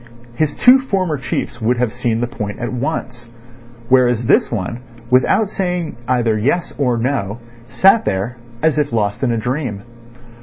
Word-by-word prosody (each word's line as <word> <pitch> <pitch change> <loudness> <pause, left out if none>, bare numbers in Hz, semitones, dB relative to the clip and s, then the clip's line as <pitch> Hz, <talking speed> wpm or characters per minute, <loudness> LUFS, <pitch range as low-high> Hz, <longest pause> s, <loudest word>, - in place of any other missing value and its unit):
His 150 +4 -1
two 255 +2 +6
former 190 - -1
chiefs 125 -2 -4
would 120 +3 +1
have 120 -2 0
seen 120 -2 -1
the 120 - 0
point 105 -4 -5
at 120 0 -4
once; 120 -3 -4 0.6
whereas 125 -2 +3
this - - +3
one, 115 +1 -3 0.3
without 130 +11 +3
saying 180 -4 -3
either 120 -3 +1
yes 145 +8 0
or 125 -4 +1
no, 115 -4 -1 0.3
sat 195 - +4
there, 100 +6 -2 0.3
as 155 -1 +3
if 145 -3 0
lost 105 -1 -1
in 130 -3 +1
a 115 - 0
dream. 120 -3 -3
125 Hz, 160 wpm, -18 LUFS, 115-150 Hz, 0.6 s, two